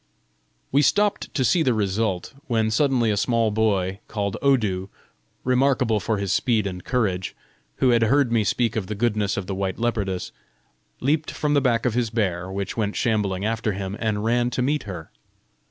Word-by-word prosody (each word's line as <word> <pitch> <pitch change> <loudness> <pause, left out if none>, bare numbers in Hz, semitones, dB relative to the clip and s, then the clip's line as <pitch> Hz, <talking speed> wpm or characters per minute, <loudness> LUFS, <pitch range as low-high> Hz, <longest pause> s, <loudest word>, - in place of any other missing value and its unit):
We 140 - +4
stopped 205 +8 +1
to 130 -3 +2
see 165 +9 +3
the 130 -7 +2
result; 100 -1 -1
when 110 -2 +1
suddenly 125 -2 +2
a - - +1
small 115 0 +1
boy, 100 -3 0
called 100 -3 -2
Odu, 105 -9 +1 0.5
remarkable 125 -3 +2
for 110 +2 -1
his 100 -2 -1
speed 115 -5 +1
and 90 -2 -5
courage, 100 -8 -1 0.4
who 130 - +2
had 120 -1 +3
heard 135 +1 +3
me 115 -2 +3
speak 115 +2 0
of 105 -4 -2
the 105 - -4
goodness 105 -2 0
of 100 - -2
the 95 - -4
white 95 -1 -2
leopardess, 105 -6 -2 0.7
leaped 150 +4 +1
from 150 -1 -1
the 145 - +4
back 120 -3 +1
of 125 - +2
his 120 -1 0
bear, 95 -5 -1
which 100 0 -4
went 105 -2 -1
shambling 105 -4 0
after 110 -1 -1
him, 95 0 -4
and 105 -2 -1
ran 120 +2 +2
to 125 0 -1
meet 145 +1 0
her. 90 -6 -7
110 Hz, 185 wpm, -23 LUFS, 100-125 Hz, 0.7 s, We